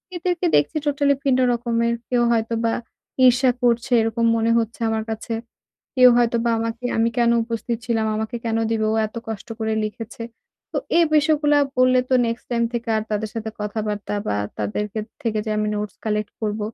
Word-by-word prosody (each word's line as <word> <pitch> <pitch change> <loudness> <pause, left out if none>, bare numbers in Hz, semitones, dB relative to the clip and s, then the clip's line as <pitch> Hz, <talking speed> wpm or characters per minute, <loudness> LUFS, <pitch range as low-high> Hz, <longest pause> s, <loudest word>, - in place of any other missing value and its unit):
এদেরকে 350 0 -1
দেখছি 145 - +2
টোটালি 285 0 +3
ভিন্ন 260 -2 +2
রকমের। 235 -1 0 0.2
কেউ 245 -1 +2
হয়তোবা 230 0 0 0.5
ঈর্ষা 250 +1 +5
করছে 240 +1 +2
এরকম 225 +1 0
মনে 225 +1 +2
হচ্ছে 230 +1 -2
আমার 220 0 -1
কাছে। 225 +1 -4 0.6
কেউ 255 -1 +8
হয়তোবা 235 0 +2
আমাকে 230 +2 -4
আমি 225 +1 +3
কেন 235 -1 +4
উপস্থিত 230 0 -3
ছিলাম, 225 -2 +1
আমাকে 220 +2 -3
কেন 225 -1 0
দিবে? 220 -1 0
ও - - 0
এত 215 - -14
কষ্ট 220 -1 -6
করে 220 -1 -1
লিখেছে। 225 +2 -6 0.5
তো - - -3 0.2
এ - - +6
বিষয়গুলা 300 -1 +3 0.2
বললে 255 0 +5
তো 260 - +2
নেক্সট 230 +1 -4
টাইম 235 -1 +1
থেকে 235 -1 -4
আর 215 - 0
তাদের 215 +1 -1
সাথে 220 -1 -4
কথাবার্তা 210 0 -3
বা 100 - 0 0.2
তাদের 105 - -1
কে 220 - -2 0.2
থেকে 220 -2 -1
যে - - -1
আমি 210 - 0
নোটস 210 -2 -4
কালেক্ট 210 -1 -1
করব, 215 -1 -2
230 Hz, 180 wpm, -22 LUFS, 220-240 Hz, 0.6 s, কেউ